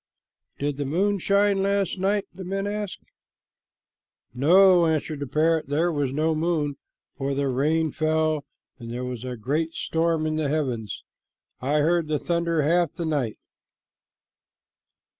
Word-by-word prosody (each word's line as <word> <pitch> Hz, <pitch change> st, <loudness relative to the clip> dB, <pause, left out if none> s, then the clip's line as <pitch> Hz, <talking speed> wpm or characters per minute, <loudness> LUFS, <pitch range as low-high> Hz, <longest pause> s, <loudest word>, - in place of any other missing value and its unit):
"Did 145 Hz, -1 st, -2 dB
the 145 Hz, -, -2 dB
moon 195 Hz, +8 st, +1 dB
shine 200 Hz, +1 st, +2 dB
last 195 Hz, -1 st, 0 dB
night?" 200 Hz, +2 st, +1 dB
the 190 Hz, +1 st, -8 dB
men 195 Hz, +2 st, -2 dB
asked. 205 Hz, -1 st, -4 dB, 1.3 s
"No," 175 Hz, +6 st, +5 dB
answered 155 Hz, -1 st, -1 dB
the 145 Hz, -, -4 dB
parrot. 160 Hz, +3 st, +1 dB
"There 160 Hz, +5 st, +1 dB
was 145 Hz, -4 st, -1 dB
no 155 Hz, +3 st, +1 dB
moon, 155 Hz, -3 st, -1 dB, 0.4 s
for 135 Hz, 0 st, -2 dB
the 140 Hz, 0 st, 0 dB
rain 155 Hz, +5 st, +1 dB
fell, 155 Hz, -1 st, 0 dB, 0.4 s
and 115 Hz, -1 st, -8 dB
there 125 Hz, +1 st, -4 dB
was 125 Hz, -2 st, -5 dB
a 125 Hz, -1 st, -5 dB
great 155 Hz, +9 st, -2 dB
storm 165 Hz, -1 st, 0 dB
in 155 Hz, 0 st, -1 dB
the 155 Hz, -3 st, 0 dB
heavens. 125 Hz, -9 st, -2 dB, 0.6 s
I 145 Hz, +4 st, +1 dB
heard 165 Hz, +1 st, +2 dB
the 155 Hz, -1 st, 0 dB
thunder 170 Hz, -1 st, 0 dB
half 170 Hz, +3 st, +2 dB
the 170 Hz, -, -4 dB
night." 140 Hz, -8 st, -1 dB
155 Hz, 145 wpm, -25 LUFS, 140-175 Hz, 1.3 s, No